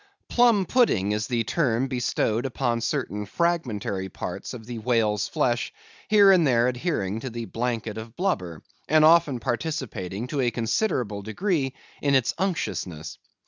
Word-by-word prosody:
Plum 235 Hz, -5 st, +4 dB
pudding 140 Hz, -, +2 dB
is 105 Hz, +1 st, -1 dB
the 120 Hz, -2 st, 0 dB
term 125 Hz, 0 st, +1 dB
bestowed 120 Hz, -1 st, 0 dB
upon 120 Hz, -2 st, -1 dB
certain 105 Hz, -2 st, -2 dB
fragmentary 115 Hz, -, -1 dB
parts -, -, -6 dB
of 110 Hz, -3 st, -10 dB
the 120 Hz, -1 st, -6 dB
whale's 110 Hz, -3 st, +1 dB
flesh, 120 Hz, -1 st, 0 dB, 0.4 s
here 205 Hz, -2 st, +7 dB
and 175 Hz, -5 st, +5 dB
there 120 Hz, -2 st, +3 dB
adhering 120 Hz, -, -1 dB
to 130 Hz, -, -5 dB
the 115 Hz, 0 st, -5 dB
blanket 115 Hz, -2 st, -3 dB
of 110 Hz, +1 st, -10 dB
blubber, 90 Hz, -, -2 dB, 0.3 s
and 155 Hz, +1 st, +6 dB
often 155 Hz, -5 st, +5 dB
participating 120 Hz, -, -3 dB
to 135 Hz, +2 st, -2 dB
a 125 Hz, -, +2 dB
considerable 115 Hz, -, -1 dB
degree 135 Hz, -, -1 dB, 0.3 s
in 140 Hz, -1 st, +2 dB
its 130 Hz, -3 st, +2 dB
unctuousness. 95 Hz, -, -3 dB
120 Hz, 145 wpm, -25 LUFS, 110-155 Hz, 0.4 s, here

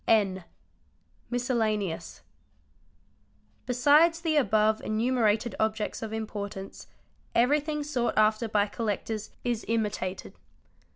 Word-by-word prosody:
N. 195 Hz, -5 st, +2 dB, 0.8 s
Miscellaneous. 220 Hz, -7 st, -1 dB, 1.4 s
Besides 295 Hz, +7 st, +4 dB
the 325 Hz, -2 st, 0 dB
above 220 Hz, -6 st, +3 dB
enumerated 225 Hz, 0 st, +1 dB
objects 220 Hz, 0 st, -1 dB
of 220 Hz, -1 st, -5 dB
importance, 205 Hz, -3 st, -6 dB, 0.5 s
everything 295 Hz, +5 st, +2 dB
sought 260 Hz, -5 st, -1 dB
after 215 Hz, +2 st, +3 dB
by 210 Hz, -1 st, +2 dB
collectors 215 Hz, 0 st, -3 dB
is 240 Hz, -3 st, -1 dB
imitated. 210 Hz, -4 st, -2 dB
220 Hz, 90 wpm, -28 LUFS, 210-245 Hz, 1.4 s, Besides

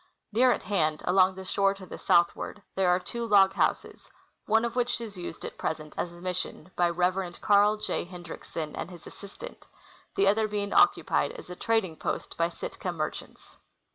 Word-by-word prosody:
Near 250 Hz, +4 st, +5 dB
at -, -, -1 dB
hand, 155 Hz, -7 st, 0 dB
along 185 Hz, +1 st, +4 dB
the 190 Hz, 0 st, -8 dB
shore 195 Hz, +1 st, +2 dB
to 195 Hz, -1 st, -11 dB
the -, -, -9 dB
southward, 175 Hz, +3 st, +2 dB
there 190 Hz, -2 st, +2 dB
are 180 Hz, +1 st, +4 dB
two 235 Hz, +5 st, -5 dB
log 200 Hz, -4 st, +5 dB
houses, -, -, -1 dB, 0.4 s
one 225 Hz, +2 st, +3 dB
of 235 Hz, -, -3 dB
which 245 Hz, 0 st, 0 dB
is 225 Hz, -3 st, -7 dB
used 175 Hz, -2 st, -7 dB
at -, -, -8 dB
present 155 Hz, -1 st, -3 dB
as 175 Hz, -, -2 dB
a 175 Hz, -, -13 dB
mission 180 Hz, -1 st, -4 dB
liy 175 Hz, -1 st, +3 dB
Reverend 180 Hz, 0 st, 0 dB
Carl 205 Hz, +1 st, +4 dB
J. 215 Hz, -, -2 dB
Hendriksen 175 Hz, -3 st, -7 dB
and -, -, -5 dB
his 175 Hz, -2 st, -12 dB
assistant, 210 Hz, -, -11 dB, 0.5 s
the 195 Hz, -, +3 dB
other 215 Hz, +2 st, +3 dB
being 205 Hz, -1 st, -2 dB
occupied 405 Hz, 0 st, +3 dB
as -, -, -10 dB
a -, -, -6 dB
trading 195 Hz, -6 st, 0 dB
post -, -, -3 dB
by 165 Hz, 0 st, +1 dB
Sitka 180 Hz, +1 st, -5 dB
merchants. 155 Hz, -3 st, -6 dB
190 Hz, 185 wpm, -28 LUFS, 175-210 Hz, 0.5 s, Near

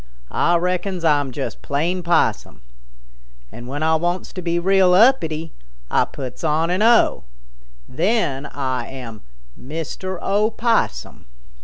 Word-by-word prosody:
"Ah 175 Hz, -, +2 dB
reckons 180 Hz, 0 st, -1 dB
Ah'm 145 Hz, -4 st, +2 dB
just 135 Hz, +2 st, -5 dB
plain 165 Hz, +6 st, -1 dB
Possum. 170 Hz, -, 0 dB, 0.9 s
When 130 Hz, +6 st, -6 dB
Ah 160 Hz, 0 st, +3 dB
wants 175 Hz, +3 st, -3 dB
to 185 Hz, -, -5 dB
be 170 Hz, 0 st, -1 dB
real 185 Hz, 0 st, +4 dB
uppity, 165 Hz, -, +3 dB, 0.4 s
Ah -, -, +3 dB
puts 130 Hz, +1 st, -8 dB
on 160 Hz, +2 st, +1 dB
an 185 Hz, +3 st, 0 dB
'o.' 230 Hz, +1 st, +4 dB, 0.6 s
Then 150 Hz, -, 0 dB
Ah 130 Hz, -2 st, -2 dB
am 115 Hz, -5 st, -9 dB, 0.3 s
Mister 165 Hz, +6 st, -6 dB
Opossum." 215 Hz, -, 0 dB
170 Hz, 120 wpm, -21 LUFS, 145-185 Hz, 0.9 s, real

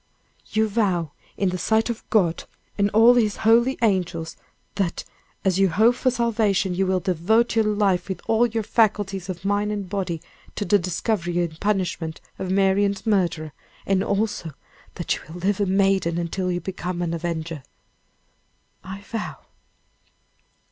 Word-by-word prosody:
"You 220 Hz, 0 st, +1 dB
vow 190 Hz, -7 st, 0 dB, 0.3 s
in 195 Hz, -, +1 dB
the 180 Hz, 0 st, -3 dB
sight 220 Hz, +3 st, +2 dB
of 230 Hz, -, -7 dB
God 175 Hz, -7 st, +2 dB, 0.3 s
and 200 Hz, 0 st, +2 dB
all 225 Hz, +4 st, +6 dB
his 220 Hz, -4 st, +2 dB
holy 235 Hz, +4 st, +4 dB
angels, 175 Hz, -6 st, 0 dB, 0.4 s
that, 195 Hz, -4 st, -2 dB, 0.4 s
as 190 Hz, -1 st, +2 dB
you 195 Hz, -1 st, +4 dB
hope 220 Hz, +8 st, +4 dB
for 255 Hz, +1 st, +1 dB
salvation, 220 Hz, -6 st, +1 dB
you 190 Hz, +1 st, 0 dB
will 185 Hz, 0 st, +2 dB
devote 190 Hz, +6 st, +1 dB
your 225 Hz, -1 st, +3 dB
life 205 Hz, -3 st, +1 dB
with 190 Hz, -2 st, -3 dB
all 225 Hz, +2 st, +3 dB
your 225 Hz, -1 st, -2 dB
faculties 200 Hz, -4 st, +1 dB
of 185 Hz, +1 st, -6 dB
mind 205 Hz, +1 st, +1 dB
and 205 Hz, -2 st, -3 dB
body, 180 Hz, -4 st, -3 dB, 0.4 s
to 205 Hz, -, -2 dB
the 205 Hz, 0 st, +4 dB
discovery 175 Hz, 0 st, -1 dB
and 160 Hz, -1 st, -6 dB
punishment 180 Hz, -5 st, -1 dB, 0.2 s
of 190 Hz, -, -3 dB
Marian's 195 Hz, +1 st, +2 dB
murderer; 175 Hz, -7 st, 0 dB, 0.3 s
and 195 Hz, -1 st, +2 dB
also 200 Hz, -6 st, -1 dB, 0.4 s
that 175 Hz, -, -1 dB
you -, -, -9 dB
will 165 Hz, +3 st, -9 dB
live 195 Hz, +2 st, +1 dB
a 200 Hz, -, +1 dB
maiden 190 Hz, -3 st, +2 dB
until 180 Hz, +2 st, -2 dB
you 175 Hz, -, -1 dB
become 180 Hz, 0 st, -4 dB
and 170 Hz, -1 st, -2 dB
avenger." 165 Hz, -2 st, -4 dB, 1.2 s
"I 190 Hz, +1 st, -8 dB
vow." 225 Hz, +1 st, -5 dB
195 Hz, 155 wpm, -23 LUFS, 175-210 Hz, 1.2 s, all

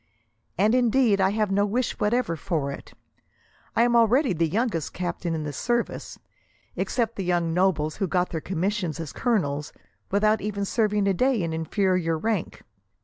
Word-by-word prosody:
And, 210 Hz, +5 st, +3 dB
indeed, 245 Hz, -4 st, +3 dB
I 190 Hz, -, +4 dB
have 210 Hz, 0 st, 0 dB
no 200 Hz, +1 st, +3 dB
wish 230 Hz, +5 st, -1 dB
whatever 220 Hz, -3 st, +1 dB
for 155 Hz, -5 st, -2 dB
it. -, -, -10 dB, 0.8 s
I 230 Hz, -, +4 dB
am 240 Hz, 0 st, +2 dB
already 235 Hz, +1 st, +4 dB
the 165 Hz, 0 st, +1 dB
youngest 200 Hz, -, -1 dB
captain 175 Hz, -1 st, -3 dB
in 155 Hz, -, -3 dB
the 145 Hz, -1 st, -4 dB
service, 240 Hz, -, -2 dB, 0.6 s
except 230 Hz, -2 st, -1 dB
the 195 Hz, -, -2 dB
young 175 Hz, -2 st, 0 dB
nobles 165 Hz, -4 st, +1 dB
who 195 Hz, -, 0 dB
got 180 Hz, +1 st, 0 dB
their 160 Hz, -, -3 dB
commissions 185 Hz, -2 st, -2 dB
as 160 Hz, -3 st, -6 dB
colonels, 150 Hz, -, -1 dB, 0.4 s
without 215 Hz, +1 st, +2 dB
even 200 Hz, -1 st, -2 dB
serving 210 Hz, -1 st, +1 dB
a 195 Hz, -, +3 dB
day 250 Hz, +1 st, +1 dB
in 165 Hz, -1 st, -2 dB
inferior 165 Hz, 0 st, 0 dB
rank. 215 Hz, +1 st, -2 dB
195 Hz, 165 wpm, -25 LUFS, 165-220 Hz, 0.8 s, I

